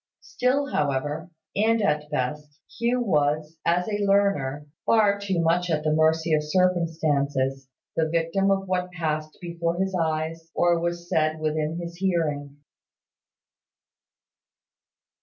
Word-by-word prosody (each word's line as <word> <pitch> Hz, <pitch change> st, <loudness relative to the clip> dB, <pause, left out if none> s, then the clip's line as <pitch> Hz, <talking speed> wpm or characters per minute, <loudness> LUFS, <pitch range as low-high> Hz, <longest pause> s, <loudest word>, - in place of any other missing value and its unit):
Still, 275 Hz, +3 st, 0 dB
however, 145 Hz, +4 st, -1 dB, 0.3 s
and 225 Hz, +3 st, +3 dB
at 150 Hz, -8 st, +2 dB
the 150 Hz, -, -18 dB
best, 150 Hz, +1 st, -3 dB, 0.2 s
Hugh 240 Hz, +2 st, +1 dB
was, 155 Hz, -4 st, 0 dB
as 175 Hz, +1 st, +1 dB
a 205 Hz, -1 st, -1 dB
learner, 195 Hz, -9 st, +1 dB, 0.2 s
far 205 Hz, -3 st, +3 dB
too 195 Hz, -3 st, -1 dB
much 170 Hz, +2 st, +2 dB
at 155 Hz, -2 st, 0 dB
the 155 Hz, 0 st, +2 dB
mercy 160 Hz, +1 st, +2 dB
of 155 Hz, -, +3 dB
circumstances 150 Hz, -6 st, 0 dB, 0.3 s
the 160 Hz, -1 st, +1 dB
victim 165 Hz, +4 st, +1 dB
of 195 Hz, 0 st, +1 dB
what 180 Hz, -1 st, -1 dB
passed 155 Hz, -2 st, -3 dB
before 170 Hz, -1 st, -2 dB
his 190 Hz, +1 st, -1 dB
eyes, 165 Hz, -1 st, -2 dB
or 175 Hz, -1 st, +3 dB
was 170 Hz, 0 st, -3 dB
said 155 Hz, -3 st, +1 dB
within 155 Hz, +1 st, -1 dB
his 170 Hz, 0 st, -6 dB
hearing. 155 Hz, -6 st, -1 dB
165 Hz, 130 wpm, -25 LUFS, 150-185 Hz, 0.3 s, and